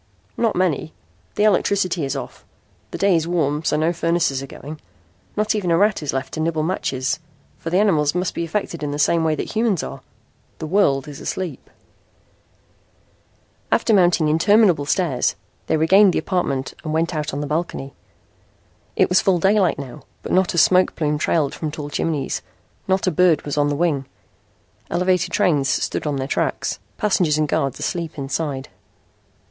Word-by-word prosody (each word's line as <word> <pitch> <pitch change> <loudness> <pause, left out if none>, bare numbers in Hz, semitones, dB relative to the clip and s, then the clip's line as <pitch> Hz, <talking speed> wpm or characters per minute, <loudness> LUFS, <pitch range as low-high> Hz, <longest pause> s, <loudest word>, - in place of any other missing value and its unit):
"Not 230 -2 0
many. 175 -4 0 0.4
The 210 - +1
electricity 190 -4 +2
is 135 +1 -3
off. 135 - -7 0.5
The - - -6
day 195 -2 +3
is 165 0 0
warm 155 -3 0
so 150 - +1
no 160 +3 +1
furnaces 165 -5 0
are 135 - -7
going. 150 +3 -9 0.6
Not 215 +1 +1
even 205 -5 -1
a 165 - +3
rat 205 +1 +2
is 150 - -2
left 135 0 -4
to - - -4
nibble 160 -1 0
matches, 135 -6 -1 0.4
for 165 - -5
the 180 - +1
animals 160 -7 +2
must 180 0 -1
be - - -3
affected 170 -1 -3
in 150 - -2
the 145 - -3
same 160 +2 +2
way 160 -1 +1
that - - -5
humans 220 -6 +1
are. - - -7 0.6
The - - -5
world 155 -6 +2
is 145 -2 -8
asleep." 185 -3 -5 2.0
After 225 - +2
mounting 175 -5 +4
interminable 175 -1 +3
stairs 155 -8 +1 0.3
they 160 - +2
regained 190 +5 +5
the - - 0
apartment 140 -8 -1
and 155 -1 -3
went 165 +2 0
out 155 -1 -2
on 140 - -4
the - - -2
balcony. 150 -2 -3 1.0
It - - +4
was 180 - +3
full 190 -2 +3
daylight 195 +1 +2
now 140 +1 -8 0.2
but - - -5
not 185 -1 +2
a - - -2
smoke 185 +2 +4
plume 150 -2 -1
trailed 155 -3 +1
from 155 - -4
tall 150 -1 -7
chimneys. 145 -3 -2 0.5
Not 190 0 +1
a 185 - +2
bird 170 -2 +3
was 145 - -3
on 145 0 +2
the 145 - -1
wing. 145 -4 0 0.8
Elevated 180 +1 +1
trains 145 -6 +2
stood - - -1
on 145 - -1
their 135 -1 -3
tracks, - - -1 0.2
passengers 180 -7 +2
and 155 -1 +1
guards 135 -2 -1
asleep 170 -3 -4
inside. 140 0 -3
160 Hz, 175 wpm, -21 LUFS, 145-185 Hz, 2.0 s, regained